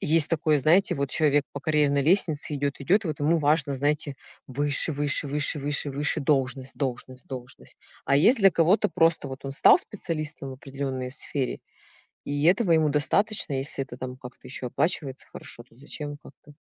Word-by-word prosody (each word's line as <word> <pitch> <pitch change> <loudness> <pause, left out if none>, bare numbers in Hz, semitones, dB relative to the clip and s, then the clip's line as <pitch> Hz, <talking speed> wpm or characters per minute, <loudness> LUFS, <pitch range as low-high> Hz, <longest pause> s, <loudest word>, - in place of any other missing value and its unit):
есть 160 -4 +3
такое, 155 -2 +1
знаете, 165 +8 +3
вот 140 -1 -2
человек 145 -2 +2
по 140 - -6
карьерной 145 -1 +2
лестнице 155 -2 +1
идёт 140 0 -1
идёт, 195 +10 +2
вот 155 -5 -4
ему 160 +3 +2
важно, 150 -1 +1
знаете, 145 +1 -1 0.3
выше 145 +4 0
выше 145 +1 0
выше 150 +1 0
выше 145 0 -2
выше 150 +3 -1
должность 135 -2 -1
должность 130 -1 -5
должность. 125 -2 -10 0.3
А 140 - +3
есть 230 - +5
для 195 -2 +6
кого-то 185 +6 +3
просто 165 -5 +1
вот, 135 +1 -9
он 135 - -4
стал 135 - +6
специалистом 155 -7 -5
в - - -6
определенной 135 -1 -5
сфере 135 -1 -3 0.6
и 145 +1 -2
этого 185 +2 +3
ему 160 -2 +3
достаточно, 150 +4 0
если 135 0 -2
это 125 -2 -11
там 130 0 -7
как-то 125 -1 -12
ещё 125 0 -5
оплачивается 135 0 -1
хорошо, 120 - -10
то 120 - -26
зачем 145 +3 -7
как 140 - -15
бы. 150 - -15
145 Hz, 175 wpm, -26 LUFS, 135-155 Hz, 0.6 s, для